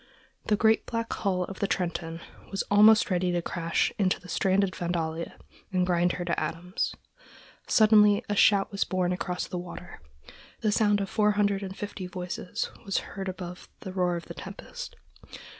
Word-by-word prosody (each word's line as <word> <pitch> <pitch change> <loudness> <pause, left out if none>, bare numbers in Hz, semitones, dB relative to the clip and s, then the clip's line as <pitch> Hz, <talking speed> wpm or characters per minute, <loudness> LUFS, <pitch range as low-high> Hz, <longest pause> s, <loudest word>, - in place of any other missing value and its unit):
The 210 - +4
great, 220 +2 +3
black 230 -1 -2
hull 185 -3 0
of 190 +1 -7
the 200 - +1
Trenton 170 -3 -2 0.3
was 195 - -2
almost 210 0 +6
ready 180 0 +1
to 175 - +1
crash 170 -1 0
into 185 -2 +2
the 180 - -14
stranded 190 +2 +2
Vandalia 170 -1 -3 0.3
and 180 -1 +2
grind 175 -1 +2
her 175 - -4
to 170 - 0
atoms. 180 +3 -3 0.7
Suddenly 210 -2 +5
a 205 - -1
shout 200 -1 +4
was 200 - +1
borne 180 -1 0
across 180 -1 -3
the 180 - -4
waters. 175 0 -9 0.6
The 215 - +2
sound 205 -1 +3
of 195 - -3
four 210 -1 +3
hundred 205 -1 +1
and 190 -1 -6
fifty 200 -2 -5
voices 180 -1 -4
was 195 - -1 0.2
heard 195 -1 -4
above 180 -1 -7
the 190 - -7
roar 180 -2 +1
of 170 - -5
the - - -8
tempest. - - -8
185 Hz, 175 wpm, -28 LUFS, 180-205 Hz, 0.7 s, almost